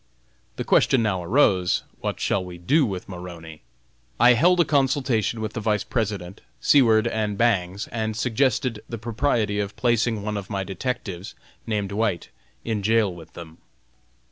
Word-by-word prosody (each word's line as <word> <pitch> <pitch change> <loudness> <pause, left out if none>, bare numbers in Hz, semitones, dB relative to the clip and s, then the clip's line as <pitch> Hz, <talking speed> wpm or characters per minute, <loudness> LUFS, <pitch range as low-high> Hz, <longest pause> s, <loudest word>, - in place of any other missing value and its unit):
The - - -3
question 125 -3 +3
now 95 -5 -1
arose: 95 -4 +2 0.2
What - - -3
shall 95 - 0
we 90 -1 -9
do 135 - +2
with 95 -3 -5
Maroney? 85 -4 -9 0.6
I 125 - +7
held 175 +9 +4
a 170 - +5
consultation 130 -6 +1
with 110 - -4
the - - -3
Vice 105 -2 0
President, 100 -5 -3 0.2
Seward, 115 -6 +4
and 110 -3 -1
Bangs, 100 -4 +1
and 110 -1 -3
suggested 125 -1 0
the 115 - -4
propriety 110 -2 0
of 100 -1 -3
placing 115 -3 +1
one 105 0 -2
of 100 -2 -7
my 100 -2 -2
detectives, 95 -2 -5 0.3
named 105 -3 -2
White, 100 -4 -1 0.4
in 110 -3 -1
jail 110 -2 +2
with 80 -2 -13
him. 80 -1 -10
110 Hz, 155 wpm, -24 LUFS, 95-120 Hz, 0.6 s, I